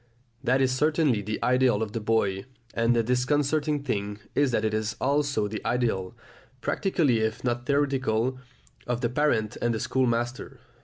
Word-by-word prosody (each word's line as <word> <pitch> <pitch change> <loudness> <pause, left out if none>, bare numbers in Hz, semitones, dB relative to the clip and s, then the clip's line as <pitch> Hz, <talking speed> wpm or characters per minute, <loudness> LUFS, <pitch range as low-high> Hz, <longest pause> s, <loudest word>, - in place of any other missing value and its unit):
That 130 +2 +2
is 130 -1 +3
certainly 150 -3 +2
the 105 +2 -3
ideal 125 -4 +3
of 105 - -5
the 115 - -3
boy, 100 -3 0 0.3
and 115 +1 +2
the 115 - +2
disconcerting 145 +4 +1
thing 100 -5 -2 0.2
is 145 -1 +3
that 110 -3 0
it 110 - 0
is 110 0 -1
also 140 -5 +1
the 110 +1 -6
ideal, 115 -5 -1 0.4
practically 155 - +1
if 110 0 -2
not 120 +1 -2
theoretically, 135 -4 +1 0.5
of 120 0 -1
the 120 - +1
parent 120 -5 0
and 120 -1 +1
the - - -2
schoolmaster. 120 -1 -1
120 Hz, 160 wpm, -26 LUFS, 110-140 Hz, 0.5 s, is